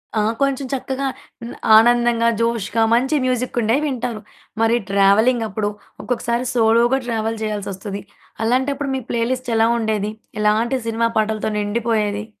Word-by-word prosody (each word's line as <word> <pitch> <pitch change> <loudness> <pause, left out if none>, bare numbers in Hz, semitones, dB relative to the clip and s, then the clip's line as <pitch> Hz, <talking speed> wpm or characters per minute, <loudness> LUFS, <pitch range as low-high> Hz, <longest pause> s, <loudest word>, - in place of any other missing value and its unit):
ఆ! 215 - +2 0.2
కొంచెం 275 -1 0
చక్కగా 270 +1 -2 0.3
హ్మ్. 235 - -7 0.2
ఆనందంగా 240 0 +4
జోష్‌గా 230 -1 0
మంచి 260 +6 +2
మ్యూజికుండేవి 250 0 0
వింటారు. 240 -5 -3 0.4
మరి 225 +1 +3
ట్రావెలింగప్పుడు 210 +2 +2 0.3
ఒక్కొక్కసారి 245 0 -1
సోలోగా 235 +2 +3
ట్రావెల్ 225 -1 -2
చేయాల్సోస్తది. 200 -1 -4 0.4
అలాంటప్పుడు 265 +3 0
మీ 265 - -3
ప్లే 235 - -1
లిస్ట్ 255 -1 -3
ఎలావుండేది? 220 -2 +1 0.3
ఎలాంటి 220 +5 +2
సినిమా 230 +1 +1
పాటలతో 215 0 0
నిండిపోయేది? 210 -1 -1
230 Hz, 115 wpm, -20 LUFS, 215-245 Hz, 0.4 s, ఆనందంగా